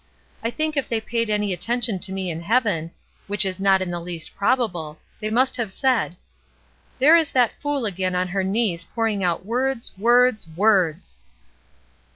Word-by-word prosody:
I 230 - 0
think 310 +4 -2
if 280 - -1
they 230 - 0
paid 230 0 -2
any 210 -2 0
atten 230 +8 -1
tion 220 -5 +1
to 190 - +1
me 190 -2 -3
in 165 0 -6
heaven 205 -5 0 0.2
— - - -36
which 205 0 +3
is 190 0 -2
not 195 -1 +3
in 180 - -5
the 175 - -3
least 170 -2 -6
probable 180 -10 -1
— - - -35
they 215 -1 -3
must 255 +5 +2
have 230 -5 -2
said, 235 -6 0 0.8
'There 295 +5 +6
is 320 -3 +1
that 245 -3 +3
fool 290 -4 -1
again 185 -2 -1
on 180 0 0
her 195 +1 -1
knees 190 -3 0
pouring 220 -3 -2
out 175 0 -1
words, 250 +2 -1
words, 240 -2 +4
words!''' 185 -4 +1
210 Hz, 190 wpm, -22 LUFS, 185-240 Hz, 0.8 s, There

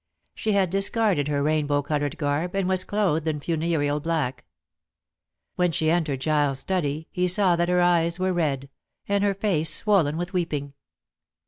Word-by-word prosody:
She 215 - -1
had 190 -3 +2
discarded 195 -5 +1
her 145 -1 0
rainbow 145 -1 +1
colored 145 -1 -2
garb, 150 +5 -1
and 195 -2 0
was 185 -1 +1
clothed 180 -7 0
in 155 -2 -1
funereal 155 -2 -1
black. 155 -5 -2 1.1
When 180 -1 +2
she 160 0 +1
entered 155 -6 0
Giles' 145 -2 +1
study 155 -2 -2
he 180 0 0
saw 185 -1 +3
that 170 +1 0
her 180 0 +3
eyes 170 -1 +2
were 185 0 0
red, 140 -5 -1 0.4
and 200 0 +1
her 200 -1 +1
face 185 -6 +1
swollen 175 -8 +2
with 175 +3 -4
weeping. 150 -6 -2
165 Hz, 160 wpm, -25 LUFS, 145-185 Hz, 1.1 s, saw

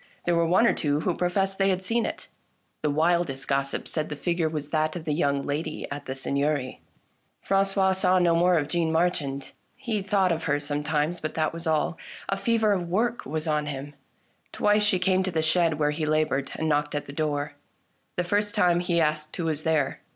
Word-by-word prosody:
There 175 - +2
were 170 0 +2
one 185 +7 +4
or - - +4
two 145 -1 0
who 180 - 0
pro 180 - 0
fessed 195 +1 0
they 195 0 +3
had 185 0 0
seen 230 +4 +1
it. - - -6 0.5
The 150 - +1
wildest 155 -3 +1
gossip 140 0 -1
said 155 -1 -1
that 150 - -4
the - - -17
figure 170 -2 +1
was 150 -2 -5
that 155 0 0
of 165 -2 -6
the 150 - 0
young 140 -3 0
lady 145 +3 -3
at 145 +1 -6
the 130 - -3
Seigneury. 140 0 -1 0.6
Francois 195 -1 +2
saw 185 0 +3
no 175 -2 +3
more 175 +1 +4
of 145 -3 0
Jeanne 165 +1 0
Marchand; 155 -5 0 0.2
he 235 -5 -2
thought 190 -2 +2
of 160 -1 -2
her 145 -1 +1
sometimes, 150 +3 -1
but 155 - -4
that 155 -1 0
was 165 0 -5
all. 160 +1 0 0.3
A 195 - +1
fever 225 +1 +1
of 180 -4 -1
work 230 - 0
was 155 +3 -3
on 150 -1 0
him. 145 0 -6 0.6
Twice 210 0 +2
she 210 -2 +3
came 185 +1 +2
to 185 - -1
the 160 -2 0
shed 160 -1 +3
where 150 -1 +1
he 155 +1 -2
laboured, 155 -3 +1
and 160 - -2
knocked 150 -1 0
at 145 - -2
the 140 - -9
door. 145 -1 -2 0.6
The 180 - +1
first 205 +4 0
time, 175 -4 +3
he 175 -1 0
asked 155 -1 0
who 170 - -2
was 155 -2 0
there. 155 -4 0
160 Hz, 215 wpm, -26 LUFS, 150-180 Hz, 0.6 s, one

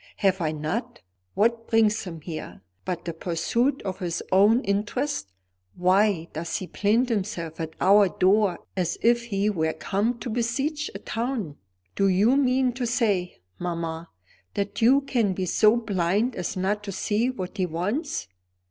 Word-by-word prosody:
"Have 190 -2 +2
I 155 -2 +1
not? 155 - -3 0.4
What 230 +2 +1
brings 220 -2 +2
him 165 -3 -7
here, 155 - -7 0.2
but 180 -2 -3
the 170 - -3
pursuit 185 - 0
of 190 -2 -4
his 175 -2 -3
own 210 +6 +5
interest? 205 - -1 0.4
Why 185 -1 +2
does 160 +2 -3
he 185 - -5
plant 220 +7 +1
himself 185 -7 -3
at 160 -1 -5
our 200 +1 +5
door 190 +1 +2
as 180 -3 -1
if 235 0 +3
he 205 -3 0
were 160 -6 0
come 220 +5 -1
to 245 - -6
besiege 270 +6 -1
a - - -2
town? 225 - -3 0.4
Do 195 - +3
you 200 +7 +4
mean 260 -2 +2
to 245 0 -2
say, 205 - 0 0.2
mamma, 170 -1 -4 0.5
that 200 +2 -2
you 260 +5 +6
can 235 -8 0
be 185 0 -2
so 215 +5 +4
blind 205 +2 0
as 180 +1 -3
not 205 +3 -1
to 200 - -4
see 215 +5 0
what 195 -5 -6
he 185 -2 +1
wants?" 205 - -2
200 Hz, 160 wpm, -25 LUFS, 180-235 Hz, 0.5 s, you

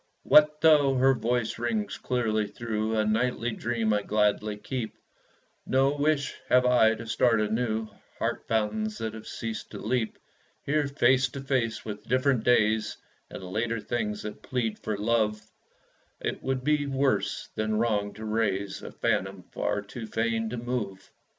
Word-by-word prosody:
What 150 0 +5
though 150 -4 +5
her 130 +1 +5
voice 120 -1 -1
rings 110 -4 -2
clearly 110 -4 0
through 110 -1 -2
A 110 - +2
nightly 120 +2 0
dream 115 -1 0
I 105 - +2
gladly 105 0 +1
keep, 115 +1 -5 0.7
No 135 +2 +2
wish 145 -1 +1 0.2
have 125 0 +5
I 115 -3 +5
to 115 - -8
start 115 0 +3
anew 110 +1 0 0.3
Heart - - -2
fountains 210 - 0
that 110 -1 -3
have 110 -1 -9
ceased 115 -2 -5
to - - -8
leap. 115 0 -1 0.5
Here, 150 0 +1
face 135 -1 +3
to 140 - -7
face 125 -5 -1
with 105 0 -7
different 130 -2 +2
days, 110 -3 +2 0.3
And - - -8
later 110 +5 -2
things 105 -1 -3
that 105 - -7
plead 120 -4 -2
for 105 -2 -3
love, 105 0 +1 0.8
It - - -3
would 130 -1 -2
be 150 0 +2
worse 135 -7 0
than 110 0 -1
wrong 105 -3 +1
to 110 +1 -7
raise 100 -3 -1
A - - -8
phantom - - -1
far 105 - -1
too 110 +2 -8
fain 115 0 -1
to 125 - -4
move. 115 -5 -4
115 Hz, 155 wpm, -28 LUFS, 110-130 Hz, 0.8 s, What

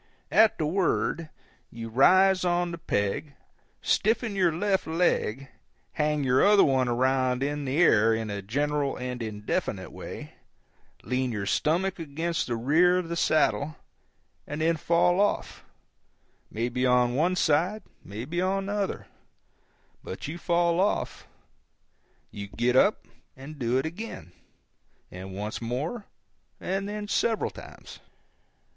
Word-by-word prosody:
At 220 0 +5
the 155 - -1
word, 170 -1 0 0.4
you 115 -1 -7
rise 185 +10 +5
on 175 -1 +1
the 170 - -6
peg, 135 +1 -2 0.5
stiffen 225 0 +1
your 180 -3 +3
left 190 +4 0
leg, 140 -6 0 0.4
hang 150 -1 0
your 130 0 +3
other 205 0 +6
one 130 -3 +2
around 130 +1 +1
in 145 0 -2
the 135 +2 -2
air 115 -10 +5
in 110 -1 -1
a 100 0 -4
general 145 +6 -1
in 125 -1 -5
indefinite 105 -2 -3
way, - - -9 0.7
lean 130 0 -1
your 105 -3 -3
stomach 180 - 0
against 165 +2 -2
the 120 - -1
rear 160 +10 +3
of 180 -2 -3
the 170 - -2
saddle, 155 -2 +1 0.7
and 150 +2 -4
then 165 +1 +2
fall 170 +3 +2
off, 205 - -1 0.9
maybe 120 +3 -2
on 125 -1 +3
one 170 +7 +1
side, 180 +6 +1 0.2
maybe 125 - -4
on 195 +1 0
the 200 - -3
other; 205 -2 -2 1.0
but 95 - -7
you 165 +4 -6
fall 170 0 +1
off. 200 +2 -1 1.0
You 100 -1 -7
get 120 +5 0
up 200 +10 +3 0.3
and 140 +3 -10
do 120 0 +1
it 135 - 0
again; 165 - -7 0.8
and 95 +1 -8
once 105 +4 -5
more; 145 - -3 0.5
and 195 +2 -3
then 210 0 -5
several 225 +1 0
times. - - -12
150 Hz, 135 wpm, -27 LUFS, 125-180 Hz, 1.0 s, other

